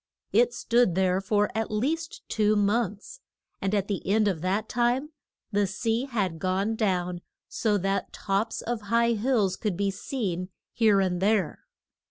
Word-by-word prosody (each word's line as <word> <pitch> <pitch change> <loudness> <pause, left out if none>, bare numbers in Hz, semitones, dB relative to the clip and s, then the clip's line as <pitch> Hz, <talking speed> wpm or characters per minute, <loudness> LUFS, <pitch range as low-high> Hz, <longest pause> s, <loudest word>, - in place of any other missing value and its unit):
It 485 0 +4
stood 235 - +2
there 185 0 +2
for 205 +1 +1
at 220 0 -1
least 305 +10 -2
two 215 -1 +2
months, 210 - 0 0.4
and 195 +2 0
at 200 -1 0
the 200 -3 -2
end 210 +2 +3
of 180 -6 -1
that 190 +4 0
time 245 +5 0 0.4
the 205 -1 +2
sea 225 +5 -1
had 200 -11 -2
gone 195 +5 0
down 180 -5 -1 0.3
so 210 -3 0
that 195 +1 -1
tops 200 +3 -2
of 235 -1 -2
high 235 +1 +3
hills 220 -4 +1
could 195 -3 -2
be 200 0 +1
seen 190 -4 -3 0.2
here 215 -4 +4
and 180 -2 0
there. 200 -3 +1
205 Hz, 160 wpm, -27 LUFS, 190-230 Hz, 0.4 s, It